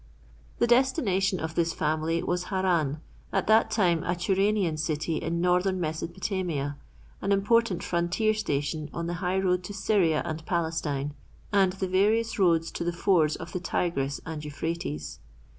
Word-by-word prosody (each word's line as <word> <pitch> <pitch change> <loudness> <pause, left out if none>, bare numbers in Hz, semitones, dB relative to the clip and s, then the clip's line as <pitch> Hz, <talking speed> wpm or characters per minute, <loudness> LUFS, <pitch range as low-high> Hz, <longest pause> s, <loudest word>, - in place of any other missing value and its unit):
The - - +3
destination 235 - +2
of 160 0 -4
this 165 0 +1
family 155 +2 0
was 180 0 -1
Haran, 175 -7 0 0.3
at - - 0
that 220 +1 +4
time 180 -7 +2
a 175 - 0
Turanian 190 -1 +1
city 155 0 -1
in 170 +1 -2
northern 180 +1 +2
Mesopotamia, 160 -2 -2 0.4
an 200 - -1
important 200 -1 +2
frontier 175 +6 +1
station 150 -6 -2
on 170 - -2
the 170 - -2
high 185 +1 0
road 180 -1 +1
to 205 - -6
Syria 185 -7 +2
and 160 0 -4
Palestine, 160 -4 -1 0.4
and 190 -2 +4
the 190 0 -3
various 215 +5 +2
roads 165 -3 +3
to - - -4
the 175 - 0
fords 170 -3 +2
of 165 +1 -8
the 180 - -3
Tigris 145 -5 -1
and 160 -2 -5
Euphrates. 150 - -4
175 Hz, 155 wpm, -27 LUFS, 160-195 Hz, 0.4 s, that